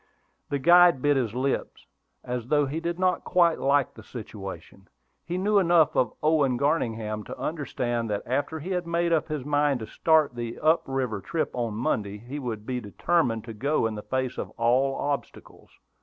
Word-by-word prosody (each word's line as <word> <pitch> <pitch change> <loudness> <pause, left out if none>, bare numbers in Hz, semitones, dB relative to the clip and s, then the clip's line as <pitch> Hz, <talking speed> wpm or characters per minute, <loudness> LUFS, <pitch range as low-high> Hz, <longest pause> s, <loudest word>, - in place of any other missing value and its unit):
The 140 - 0
guide 175 -1 +6
bit 145 0 +4
his 120 -4 -1
lips, 135 +2 -2 0.4
as 125 -1 -4
though 145 +1 +3
he 145 +4 -3
did 170 +1 -3
not 185 0 +1
quite 170 -2 +3
like 140 0 +2
the 110 - -12
situation. 95 -5 -9 0.4
He 175 +1 -3
knew 205 +2 +3
enough 170 -5 +4
of 125 - +2
Owen 150 -5 +3
Garningham 115 -7 -1
to - - -8
understand 120 -7 -2
that, 105 -1 -2
after 145 +5 -1
he 175 +6 -6
had 180 -2 -2
made 170 0 +1
up 160 - +1
his 150 -4 -4
mind 145 -2 +2
to - - -4
start 155 +4 +2
on 120 - -18
the 120 -1 -4
up 160 +2 +3
river 130 -6 -2
trip 165 - -2
on 115 -3 -2
Monday, 105 -3 -1
he 125 +7 -7
would 115 -5 -5
be 125 0 -2
determined 115 - 0
to 115 - -8
go 140 +5 0
in 110 - -1
the 105 - -6
face 130 +4 -2
of - - -4
all 130 +4 +2
obstacles. 145 -1 -5
135 Hz, 190 wpm, -26 LUFS, 115-160 Hz, 0.4 s, guide